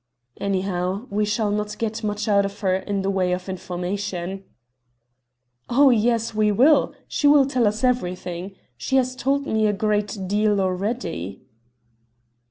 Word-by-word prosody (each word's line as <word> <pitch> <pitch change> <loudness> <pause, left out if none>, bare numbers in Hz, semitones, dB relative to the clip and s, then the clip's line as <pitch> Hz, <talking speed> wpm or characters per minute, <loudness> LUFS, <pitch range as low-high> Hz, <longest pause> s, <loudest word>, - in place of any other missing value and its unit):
"Anyhow, 190 +1 -1
we 210 +1 +1
shall 210 0 0
not 210 0 -2
get 225 0 -3
much 210 0 -2
out 200 -1 +4
of 200 +1 -6
her 190 -2 +2
in 195 +1 -2
the 195 - 0
way 185 -2 +1
of 180 +1 -4
information." 185 +1 -4 1.3
"Oh, 270 +2 +5
yes, 230 0 +1
we 215 -1 +2
will. 270 +9 +4
She 290 - +1
will 285 -1 +6
tell 255 -4 +1
us 215 +4 -2
everything. 185 -6 -2 0.2
She 265 - -2
has 255 -1 +2
told 275 +2 0
me 220 -3 +1
a 210 - +1
great 210 0 -1
deal 210 +1 +2
already." 185 - -3
205 Hz, 150 wpm, -23 LUFS, 190-230 Hz, 1.3 s, will